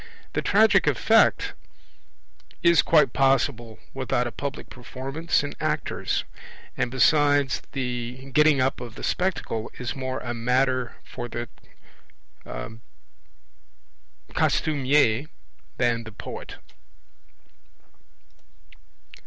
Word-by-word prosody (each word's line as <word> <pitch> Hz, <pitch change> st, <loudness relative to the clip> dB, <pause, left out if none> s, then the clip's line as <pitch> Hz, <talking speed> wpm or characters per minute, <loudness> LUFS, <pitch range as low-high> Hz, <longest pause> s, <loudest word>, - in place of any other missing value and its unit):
The -, -, 0 dB
tragic -, -, +4 dB
effect -, -, +3 dB, 1.1 s
is 170 Hz, -1 st, +6 dB
quite 150 Hz, -7 st, +4 dB
possible 130 Hz, -4 st, +1 dB, 0.2 s
without 130 Hz, -2 st, -1 dB
a 120 Hz, -, -3 dB
public 140 Hz, +2 st, -6 dB
performance 135 Hz, +6 st, -2 dB
and 145 Hz, -, -5 dB
actors; -, -, -1 dB, 0.5 s
and 125 Hz, -, -1 dB
besides, 145 Hz, +1 st, +3 dB
the 125 Hz, 0 st, -4 dB
getting 150 Hz, 0 st, +5 dB
up 130 Hz, 0 st, 0 dB
of 120 Hz, -2 st, -8 dB
the -, -, -9 dB
Spectacle 175 Hz, -12 st, -1 dB
is 125 Hz, -, -4 dB
more 130 Hz, -1 st, -3 dB
a 120 Hz, -1 st, -4 dB
matter 125 Hz, +1 st, 0 dB
for 120 Hz, -1 st, -7 dB
the 120 Hz, 0 st, -5 dB, 2.8 s
costumier 140 Hz, -3 st, +2 dB, 0.5 s
than 120 Hz, -1 st, +1 dB
the 110 Hz, -, -10 dB
poet. 105 Hz, -, -8 dB
130 Hz, 95 wpm, -25 LUFS, 120-140 Hz, 2.8 s, is